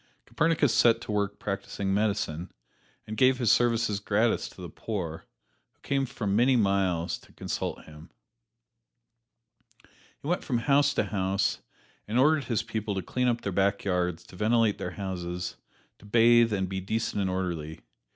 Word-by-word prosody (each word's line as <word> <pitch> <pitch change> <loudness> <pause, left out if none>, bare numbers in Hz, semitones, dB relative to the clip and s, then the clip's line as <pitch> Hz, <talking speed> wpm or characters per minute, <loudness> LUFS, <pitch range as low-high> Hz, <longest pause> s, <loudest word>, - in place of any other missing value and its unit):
Copernicus 160 -5 +2
set 115 -1 +5
to 120 - -6
work 100 -1 -1
practising 100 -1 -3
medicine, 100 -5 -1 0.5
and 110 - -6
gave 130 +1 +4
his 120 -4 +3
services 115 -3 +2
gratis 110 +3 +1
to - - -17
the 90 - -6
poor, 85 -2 -5 0.5
who - - -42
came 135 -1 0
for 115 - -6
many 120 +7 +3
miles 95 -6 +1
to - - -20
consult - - -4
him. 75 +2 -13 1.7
He - - -16
went 175 +2 0
from 125 - 0
house 140 +3 +3
to - - +2
house 95 -1 0 0.5
and 110 +3 -1
ordered 150 +1 +4
his 115 -3 -1
people 110 -2 -3
to 95 - -2
clean 125 +8 -1
up 120 -1 +1
their 100 - -3
back 100 +1 +1
yards, 90 -3 -1
to - - -15
ventilate 110 +1 +2
their - - -3
houses, 90 -2 -4 0.4
to - - -17
bathe 115 +1 +5
and 95 -2 0
be 95 0 -4
decent 105 +1 -2
and 95 - 0
orderly. 85 -4 -3
105 Hz, 160 wpm, -28 LUFS, 95-120 Hz, 1.7 s, set